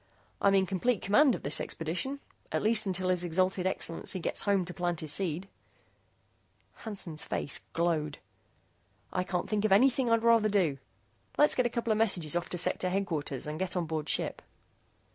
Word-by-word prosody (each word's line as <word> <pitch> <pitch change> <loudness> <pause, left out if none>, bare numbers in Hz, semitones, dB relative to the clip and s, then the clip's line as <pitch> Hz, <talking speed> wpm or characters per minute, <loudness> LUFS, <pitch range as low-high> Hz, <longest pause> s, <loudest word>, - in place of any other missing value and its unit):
"I'm 195 0 +4
in 190 -1 +4
complete 200 +3 0
command 255 +6 +4
of - - -9
this 140 - +1
expedition 185 - -3 0.3
at - - -1
least 215 -1 +3
until 185 -1 0
His 180 -1 +2
Exalted 185 +2 0
Excellency 185 0 -2
gets - - 0
home 200 -3 +1
to 180 - -7
plant 175 -2 -2
his 155 -2 -1
seed." 180 0 -2 1.3
Hansen's 190 -8 -6
face 140 - -3
glowed. 160 -3 0 1.0
"I 180 - 0
can't 180 -1 -3
think 215 -1 -1
of 215 - +1
anything 250 +4 +4
I'd 230 0 +2
rather 230 -2 +4
do. 175 -9 +1 0.6
Let's 295 - +7
get 250 -1 +2
a - - -5
couple 235 -1 -2
of 215 - +1
messages 175 -8 +2
off 175 0 -2
to 180 - -4
Sector 180 +1 +1
Headquarters 165 -8 -2
and 150 +1 -5
get 185 -1 -2
on 175 - 0
board 160 -1 -4
ship." - - -1
185 Hz, 180 wpm, -30 LUFS, 170-215 Hz, 1.3 s, Let's